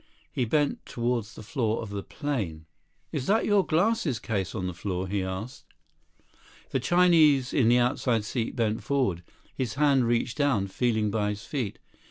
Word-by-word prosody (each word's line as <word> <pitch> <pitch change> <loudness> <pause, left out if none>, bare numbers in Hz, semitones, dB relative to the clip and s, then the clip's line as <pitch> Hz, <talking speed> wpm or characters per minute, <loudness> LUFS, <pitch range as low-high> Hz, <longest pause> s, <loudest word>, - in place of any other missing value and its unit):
He 125 - 0
bent 145 +5 0
toward 120 -2 -1
the 110 0 -12
floor 115 -1 -1
of 105 - -8
the 100 -1 -3
plane. 100 - -4 0.5
"Is 130 - -3
that 220 +3 +3
your 205 -2 +4
glasses 175 - +1
case 100 -3 -3
on 95 -4 -2
the 90 - -3
floor?" 95 +1 -3
he 100 +1 -1
asked. 95 +7 -5 1.1
The 135 - +1
Chinese 155 -4 +4
in 120 -5 +4
the 120 - +5
outside 120 -2 +1
seat 115 +1 -3
bent 110 -3 0
forward. 130 -12 0 0.3
His 130 -2 -3
hand 140 -4 +3
reached 120 +2 0
down, 120 -10 +2
feeling 110 -1 0
by 105 -1 0
his 105 +1 -5
feet. 125 -9 -3
120 Hz, 170 wpm, -27 LUFS, 105-140 Hz, 1.1 s, the